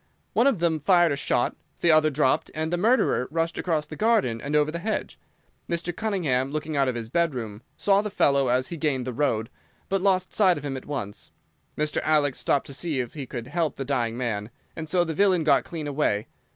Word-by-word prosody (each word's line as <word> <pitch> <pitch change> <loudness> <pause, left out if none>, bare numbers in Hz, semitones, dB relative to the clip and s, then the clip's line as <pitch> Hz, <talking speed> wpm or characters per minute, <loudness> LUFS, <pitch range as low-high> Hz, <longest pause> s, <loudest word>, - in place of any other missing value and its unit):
One 245 - +4
of 275 - +3
them 165 -2 +1
fired 175 +1 +4
a - - +1
shot, 125 -3 0 0.3
the 170 - +5
other 155 0 +5
dropped, 145 -2 +1
and 160 +2 -2
the - - +4
murderer 215 - +2
rushed 165 +1 -1
across 160 -4 0
the - - -9
garden 210 - +1
and 145 +2 -2
over 150 0 +3
the 170 - -4
hedge. 215 +5 -3 0.5
Mr. 170 0 -2
Cunningham, 160 -12 0
looking 155 +1 -3
out 140 -1 +2
of 130 - -1
his 115 -2 -4
bedroom, 120 -8 -2 0.2
saw 200 0 +3
the 210 - -4
fellow 140 -8 +2
as 125 +1 +1
he 170 - -5
gained 145 -5 0
the 130 - -4
road, 115 -4 0 0.4
but 195 -1 0
lost 185 -1 +1
sight 185 -4 +4
of 145 - -7
him 135 -2 -3
at 130 - -8
once. 115 -9 -5 0.5
Mr. 150 0 0
Alec 150 -3 +2
stopped 140 - 0
to 140 - -8
see 150 -1 -1
if 120 -2 -3
he 140 -4 -6
could 120 -1 -6
help 160 +3 -1
the 135 - -5
dying 120 -4 -1
man, 110 -4 -2 0.3
and 160 -1 -6
so 175 +2 +3
the 165 -1 -3
villain 185 -1 +3
got 145 -3 +3
clean 160 -3 -6
away. 140 -8 0
150 Hz, 220 wpm, -25 LUFS, 130-170 Hz, 0.5 s, the